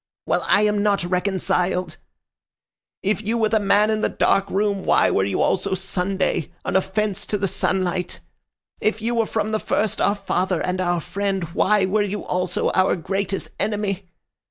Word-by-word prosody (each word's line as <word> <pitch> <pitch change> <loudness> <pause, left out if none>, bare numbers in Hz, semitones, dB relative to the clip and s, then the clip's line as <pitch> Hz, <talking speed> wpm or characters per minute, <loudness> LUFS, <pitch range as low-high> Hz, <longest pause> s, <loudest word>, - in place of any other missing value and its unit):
Well, - - +1
I 205 - +4
am 210 -1 +2
not 205 -3 +2
reconciled. 180 -1 0 1.1
If 205 +2 +1
you 220 +2 -1
were 220 -2 +2
the 220 - +3
man 205 +1 +3
in 215 0 0
the - - +1
dark 195 0 +2
room, 200 -1 0
why - - +3
were 95 - +2
you 100 - 0
also 190 - +1
Sunday, 190 -2 -1
an - - -2
offense 190 +1 0
to 210 - 0
the 200 -1 0
sunlight? 185 -1 -1 0.6
If 215 +1 0
you 230 +2 -1
were 230 -2 +1
from 215 -1 -1
the 215 - 0
first 215 0 -1
our 200 - +3
father 185 -3 -1
and 185 +1 -1
our 175 -1 0
friend, 195 +1 -2
why 210 0 +3
were 205 +3 +1
you 205 0 -2
also 180 -1 0
our 185 0 +3
greatest 195 +2 -2
enemy? 200 -3 -2
195 Hz, 175 wpm, -22 LUFS, 185-210 Hz, 1.1 s, I